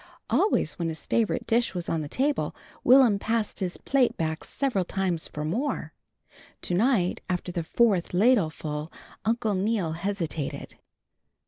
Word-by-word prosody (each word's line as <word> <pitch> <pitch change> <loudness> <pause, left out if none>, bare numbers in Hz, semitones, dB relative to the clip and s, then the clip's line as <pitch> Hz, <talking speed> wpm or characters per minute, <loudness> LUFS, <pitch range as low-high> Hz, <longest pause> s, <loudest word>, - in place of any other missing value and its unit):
Always 240 - +2
when 170 - 0
his 160 - -5
favorite 225 -2 0
dish 230 -3 +1
was 175 -1 -4
on 165 - 0
the 145 - -6
table, 280 - 0 0.3
Will'm 250 -5 +6
passed 225 0 -1
his 180 -2 -2
plate 270 -3 +1
back 160 0 -2
several 255 -9 0
times 180 -3 -2
for 150 0 -5
more. 240 - -2 0.7
To - - -2
night 200 -2 +2
after 180 0 -2
the 170 -1 -2
fourth 195 0 +2
ladleful 160 -7 +1 0.3
Uncle 225 -1 +1
Neal 195 -3 0
hesitated. 165 -4 -3
190 Hz, 140 wpm, -27 LUFS, 165-230 Hz, 0.7 s, Will'm